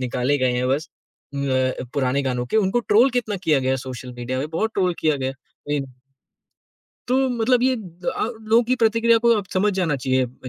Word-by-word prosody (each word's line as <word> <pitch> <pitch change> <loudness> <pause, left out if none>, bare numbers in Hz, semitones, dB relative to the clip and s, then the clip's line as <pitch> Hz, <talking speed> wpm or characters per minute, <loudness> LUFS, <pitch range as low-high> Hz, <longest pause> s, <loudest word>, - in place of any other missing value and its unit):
निकाले 125 +3 0
गए 130 -1 +1
हैं 125 +1 0
बस 150 +4 -1 0.5
उम 140 0 -2
अ, 130 0 0
पुराने 140 0 +1
गानों 125 -2 -2
के 220 - -1
उनको 215 +3 +2
ट्रोल 235 +4 +4
कितना 210 -4 -3
किया 155 -4 +3
गया 130 +1 0
सोशल 125 0 -7
मेडिया 125 +2 -3
में 145 +3 -3
बहुत 220 +7 -1
ट्रोल 180 -3 +1
किया 155 -2 +2
गया। 135 0 -2 0.4
इम 135 -1 -3 1.2
तो 265 +1 +2
मतलब 245 +1 +1
ये 260 0 +3
अ, 180 -5 -4 0.2
लोगों 225 +2 +3
की 255 +2 +1
प्रतिक्रिया 230 0 +3
को - - +5
अब 200 -2 -3
समझ 205 +2 +2
जाना 165 -6 0
चाहिए 130 0 +1
अ, 130 +1 -11
155 Hz, 200 wpm, -22 LUFS, -, 1.2 s, को